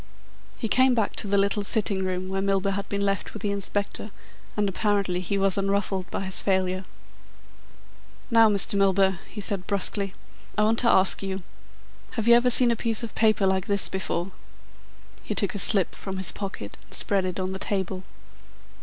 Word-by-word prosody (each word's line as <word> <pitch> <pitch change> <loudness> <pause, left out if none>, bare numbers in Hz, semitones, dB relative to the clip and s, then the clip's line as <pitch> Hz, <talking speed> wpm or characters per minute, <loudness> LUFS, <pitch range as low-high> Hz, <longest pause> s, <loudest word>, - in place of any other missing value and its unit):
He 225 - -3
came 255 +3 +3
back 220 -4 -1
to - - +1
the 200 0 +1
little 200 +1 +1
sitting 200 -2 0
room 185 0 -3
where 195 0 -2
Milburgh 195 0 0
had 200 +1 -5
been 200 0 -1
left 195 0 -2
with 215 - -7
the 205 - 0
Inspector 200 +1 -3 0.5
and 205 -1 +1
apparently 195 -2 0
he 185 +2 -2
was 195 0 +1
unruffled 195 -1 -1
by - - -4
his 190 -1 -4
failure. 185 -1 -1 1.5
"Now, 225 -1 +6
Mr. 200 -1 +2
Milburgh," 195 -1 +2
he 215 - -9
said 195 -3 -2
brusquely, 200 0 0 0.4
"I 210 - +3
want 225 +1 +2
to 240 - +3
ask 190 -2 +5
you: 190 -1 -4 0.7
Have 225 -2 -3
you 235 - +7
ever 240 +1 +4
seen 245 0 +7
a - - +1
piece 230 +1 0
of 230 - -6
paper 215 -3 +2
like 190 0 0
this 200 -2 +1
before?" 190 -1 -3 0.9
He - - -5
took 200 - +2
a 205 - -4
slip 190 -1 +2
from 190 -1 -7
his 190 -1 +2
pocket 195 - -7
and - - -5
spread 195 -2 +2
it 185 0 -4
on 185 0 -2
the 190 - -5
table. 190 -2 -2
195 Hz, 190 wpm, -25 LUFS, 190-210 Hz, 1.5 s, you